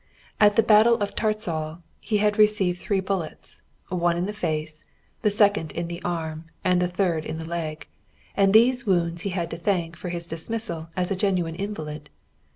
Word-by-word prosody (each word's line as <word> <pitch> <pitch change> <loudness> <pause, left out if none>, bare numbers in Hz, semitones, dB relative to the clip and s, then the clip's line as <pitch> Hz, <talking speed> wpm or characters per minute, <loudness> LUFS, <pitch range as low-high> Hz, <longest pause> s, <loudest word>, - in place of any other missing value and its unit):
At 205 -1 +6
the 225 - +5
battle 220 +2 +6
of 205 -2 -2
Tarczal 175 -7 -2 0.2
he 215 0 0
had 210 +1 +1
received 200 -4 +3
three 195 -2 0
bullets, 190 -4 -4 0.3
one 175 -1 +1
in 175 - 0
the 205 - -4
face, 155 -5 -3 0.4
the 215 - +3
second 205 -5 +2
in 170 0 -3
the 170 +1 -6
arm, 160 -2 -3 0.2
and 180 -1 +3
the 180 - +2
third 175 -3 0
in 160 - -5
the 160 - -6
leg, 160 -2 -4 0.5
and 195 -1 +4
these 240 +2 +4
wounds 170 -2 +1
he 200 - -2
had 175 -3 -3
to 165 - -4
thank 170 -2 -1
for 180 - -6
his 170 -1 -2
dismissal 165 0 -4
as 180 +1 0
a - - +2
genuine 180 -4 0
invalid. 155 -6 -5
180 Hz, 185 wpm, -25 LUFS, 165-205 Hz, 0.5 s, At